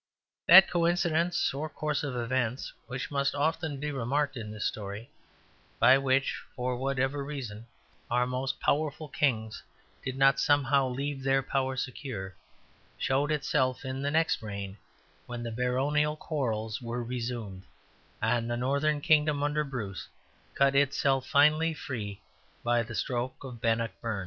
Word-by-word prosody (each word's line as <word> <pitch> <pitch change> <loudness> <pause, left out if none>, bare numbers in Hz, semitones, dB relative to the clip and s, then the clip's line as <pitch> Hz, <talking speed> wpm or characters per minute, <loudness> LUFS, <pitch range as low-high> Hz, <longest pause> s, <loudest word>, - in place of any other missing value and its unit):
That 190 +3 +10
coincidence 170 -1 +1
or 150 +3 -3
course 150 -1 -2
of 140 -3 -3
events, 120 +1 -1
which 130 +2 -5
must 140 0 0
often 155 0 -1
be 150 +1 -2
remarked 135 +2 -1
in 110 -3 -6
this 105 -1 -4
story, 105 +2 -4 0.7
by 135 - +6
which 135 0 +1
(for 125 0 -1
whatever 135 +2 -1
reason) 120 -6 -6 0.4
our 125 +1 +2
most 130 +2 -2
powerful 155 +1 0
kings 115 -6 -1 0.4
did 130 0 -4
not 135 -2 +5
somehow 140 -1 +3
leave 135 +2 -3
their 135 0 +2
power 130 0 -1
secure, 125 -7 -5 0.6
showed 140 +3 +1
itself 140 -3 0
in 130 +1 -3
the 140 - 0
next 160 +2 +2
reign, 100 -2 -6 0.5
when 120 -1 -5
the 115 - -4
baronial 135 +6 +1
quarrels 115 -9 -2
were 120 0 -3
resumed 115 -5 -4 0.6
and 115 +1 +1
the 120 - -1
northern 140 +4 +1
kingdom, 150 -2 +3
under 150 +1 +1
Bruce, 110 - -5 0.5
cut 140 0 +4
itself 135 -1 +2
finally 155 +3 +4
free 105 -9 -5 0.4
by 120 0 +2
the 110 -1 -6
stroke 125 +3 -2
of 125 -4 -8
Bannockburn. 115 -2 -1
135 Hz, 140 wpm, -29 LUFS, 120-145 Hz, 0.7 s, That